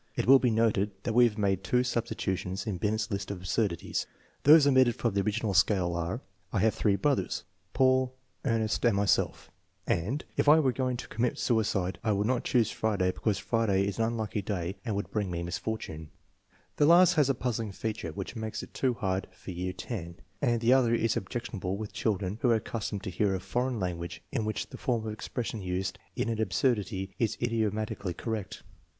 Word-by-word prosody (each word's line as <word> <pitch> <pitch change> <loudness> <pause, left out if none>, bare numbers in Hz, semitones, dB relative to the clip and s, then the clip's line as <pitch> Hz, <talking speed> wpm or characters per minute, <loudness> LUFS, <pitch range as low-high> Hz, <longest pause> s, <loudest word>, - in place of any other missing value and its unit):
It - - 0
will 135 +2 +8
be 125 - +2
noted 110 -3 +2
that 115 - -1
we 120 +1 +7
have 110 -2 0
made 95 -2 +1
two 125 +6 +2
substitutions 95 -6 -2
in 100 -5 -3
Binet's 105 +2 -1
list 100 0 -3
of 100 - -3
absurdities. 90 0 -1 0.4
Those 150 0 +8
omitted 130 -4 +5
from 115 -4 -1
the 100 - +2
original 105 +1 -1
scale 90 -1 +3
are: 85 +8 -2 0.2
" 90 +1 -41
I - - -1
have 110 0 +3
three 100 -3 +2
brothers 135 +8 0 0.3
Paul, 130 -1 +3 0.3
Ernest, 115 -4 0
and 120 -4 +4
myself" 100 0 +1 0.3
and, 105 - -1
" - - -34
If - - +4
I 155 +2 +8
were 135 -4 +3
going 125 -1 -1
to - - -7
commit 120 +1 -1
suicide 95 -6 0
I 110 -2 +2
would 100 +1 0
not 125 +1 +1
choose 115 -3 +2
Friday, 100 -4 +1
because 105 +1 -1
Friday 110 -5 +1
is 100 +2 -3
an 115 - +3
unlucky 110 -2 -2
day 95 -2 -3
and 110 -4 -2
would 100 - -3
bring 105 -3 -1
me 85 -1 -3
misfortune" 85 -4 -4 0.7
The 145 - +4
last 175 +2 +7
has 150 -5 +3
a 135 - +2
puzzling 115 -4 -2
feature 105 -4 -4
which 100 +7 -6
makes 110 -1 -4
it - - -10
much - - -33
too 130 -2 +3
hard 95 -4 -1
for 95 - -9
year 90 +1 -3
X, 85 -8 -5 0.3
and 120 -4 +2
the 120 +2 +5
other 120 -3 +4
is 115 -1 +1
objectionable 100 -3 -3
with 105 0 -6
children 100 -1 -1
who 125 - +3
are 115 - +5
accustomed 105 -2 -3
to 95 - -4
hear 95 +2 +1
a - - -2
foreign 120 +6 -1
language 85 -2 -4
in 110 - -1
which 110 - -3
the - - -9
form 115 -3 -1
of 110 - -3
expression 115 0 -4
used 90 0 -3 0.2
in 115 - -1
the 110 - -2
absurdity 95 -2 0
is 115 -3 0
idiomatically 110 -5 -1
correct. 110 -3 -4
110 Hz, 205 wpm, -29 LUFS, 95-120 Hz, 0.7 s, will